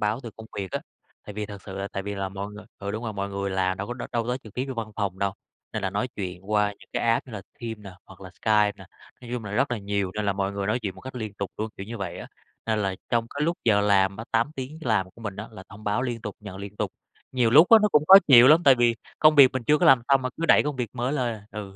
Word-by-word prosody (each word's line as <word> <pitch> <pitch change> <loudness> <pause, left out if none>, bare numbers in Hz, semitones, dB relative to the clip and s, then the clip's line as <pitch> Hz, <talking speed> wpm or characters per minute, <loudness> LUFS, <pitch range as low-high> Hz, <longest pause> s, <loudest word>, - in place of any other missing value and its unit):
báo 105 +4 0
từ 115 - -7
công 110 0 -10
việc 95 -3 -4
á. - - -2 0.4
Tại 105 - -8
vì 105 -1 -4
thật 100 -1 -10
sự 95 - -8
là 100 0 -3
tại 100 - -3
vì 100 +1 -4
là 95 -1 -3
mọi 100 +2 -6
người 105 0 -11
ừ, 100 0 -4
đúng 110 +3 -5
rồi, 110 - -3
mọi 100 0 -3
người 100 0 -3
làm 95 0 0
đâu 100 - -4
có 120 - -5
đâu 125 - -6
đâu 115 -1 0
tới 125 +1 -1
trực 110 - -13
tiếp 130 - -1
vô 130 - -4
văn 115 -2 -5
phòng 100 -3 -2
đâu. 100 0 0 0.4
Nên 110 - -3
là 95 - -1
nói 105 +6 -2
chuyện 95 0 -6
qua 105 -1 +3
những - - -19
cái - - -1
app 115 +2 +1
như 125 - -12
là 100 -3 -6 0.2
Teams 115 -2 -5
nè, 100 -2 -10 0.2
hoặc 95 0 -15
là 95 -2 -10
Skype 105 -1 +3
nè, - - -12 0.4
nói 120 -1 -11
chung 115 -3 -5
là 100 - -6
rất 135 +4 +1
là 120 - -1
nhiều, 100 -2 -2
nên 105 0 -2
là 100 - +2
mọi 95 0 -2
người 100 0 -3
nói 110 +4 +1
chuyện 100 -3 -3
một - - -13
cách 130 0 -9
liên 110 -4 -5
tục 100 -2 -5
luôn, 110 +1 -2
kiểu 95 - -7
như 115 0 -7
vậy 95 -3 -5
á. - - -8 0.4
Nên 110 -1 +1
là 95 -2 -1
trong 115 -1 +1
cái 145 - -4
lúc 170 +1 0
giờ 105 -3 +4
làm 100 -1 +3
á, 115 - -7
8 115 +6 +2
tiếng 135 +4 -6
làm 105 -8 0
của 115 - -18
mình 100 -3 -5
á, 110 - -6
là 100 -4 -11
thông 105 +2 -13
báo 105 +4 0
liên 120 -3 -3
tục, 105 -3 -6
nhận 105 -3 -9
liên 100 +1 -9
tục. - - -2 0.4
Nhiều 125 -3 +2
lúc 155 +7 +8
á 225 - +10
nó 210 - +4
cũng 150 0 +4
khó 190 - +10
chịu 125 -1 +9
lắm, 160 +3 +6
tại 135 - +8
vì 120 -1 +3 0.2
công 155 0 +6
việc 140 -3 +8
mình 130 - -3
chưa 150 0 +4
có - - +3
làm 130 -3 +6
xong 135 -2 +4
mà 130 - -1
cứ 165 - -2
đẩy 160 - +6
công 145 -2 -3
việc 120 -4 -3
mới 125 +2 -2
lên 125 -5 -1
à, 105 -1 -13
ừ. 105 -2 -7
105 Hz, 325 wpm, -25 LUFS, 100-125 Hz, 0.4 s, á